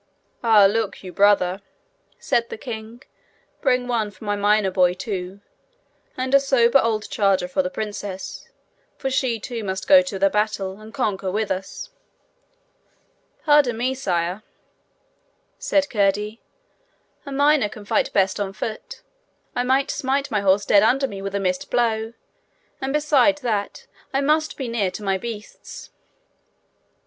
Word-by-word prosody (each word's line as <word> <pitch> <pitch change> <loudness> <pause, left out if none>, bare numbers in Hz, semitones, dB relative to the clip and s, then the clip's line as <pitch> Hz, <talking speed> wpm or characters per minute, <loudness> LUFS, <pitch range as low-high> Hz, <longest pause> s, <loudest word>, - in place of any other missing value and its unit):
'And 210 -4 +5
look 220 -4 -2
you, 185 -1 -8
brother!' 195 -2 +3 0.6
said 235 -1 0
the - - -6
king; 225 0 -8 0.6
'bring 250 -2 +1
one 230 -4 0
for 200 +1 -16
my 205 0 0
miner 205 -1 +2
boy 180 -1 +3
too, 190 -1 -5 0.8
and 260 +1 -2
a 275 - +8
sober 265 -2 +4
old 220 -2 -1
charger 195 -3 +2
for 185 +1 0
the 180 - -3
princess, 205 -2 -6 0.5
for 270 - -3
she 255 -3 0
too 230 +2 -5
must 190 -1 -4
go 285 -1 +8
to 270 -8 -5
the 195 +1 +3
battle, 210 -2 -1
and 215 +1 -11
conquer 205 -7 -2
with 215 +2 -2
us.' 190 - -5 1.5
'Pardon 290 -6 +4
me, 255 +3 0
sire,' 180 -6 -2 1.2
said 290 -1 +1
Curdie; 210 -1 0 0.9
'a - - -6
miner 285 -4 +3
can 210 0 -11
fight - - +1
best 195 0 +1
on 195 -1 -3
foot. 215 +1 -6 0.5
I - - +1
might 265 +2 +1
smite 275 +2 -1
my 210 -2 +1
horse 200 +1 +3
dead 200 - +5
under 265 +5 +3
me 200 -5 -8
with 195 0 -4
a - - +1
missed 185 -2 -2
blow. 225 -2 0 0.7
And 265 0 -2
besides 295 -1 +3
that, 210 -5 -3 0.3
I 275 - +2
must 310 +2 +1
be 265 - -4
near 225 -5 0
to 185 +3 -8
my 195 -1 0
beasts.' 220 -1 -9
215 Hz, 150 wpm, -22 LUFS, 195-255 Hz, 1.5 s, a